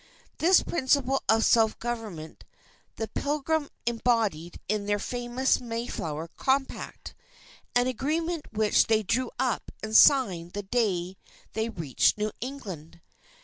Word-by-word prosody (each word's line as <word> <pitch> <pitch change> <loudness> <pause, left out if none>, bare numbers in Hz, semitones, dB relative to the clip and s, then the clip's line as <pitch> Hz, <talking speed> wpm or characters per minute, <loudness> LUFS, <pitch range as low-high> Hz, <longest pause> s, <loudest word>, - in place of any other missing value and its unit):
This 355 +3 +5
principle 270 -3 +1
of 225 0 +4
self 225 -2 +4
government, 220 -10 -6 0.5
the 225 - -3
Pilgrims 295 +3 -1 0.2
embodied 225 -8 0
in 205 0 -1
the 205 0 +2
famous 245 +4 0
Mayflower 230 -10 -4
Compact, 270 0 -2 0.6
an 245 0 +4
agreement 305 +6 -2
which 215 -1 +3
they 220 -1 +3
drew 235 +4 0
up 250 -4 -1
and 220 0 -3
signed 190 - +5
the 205 - -4
day 190 -4 -1 0.4
they 220 +1 -1
reached 165 - +1
New 210 0 -1
England. 190 - -7
230 Hz, 120 wpm, -27 LUFS, 205-260 Hz, 0.6 s, This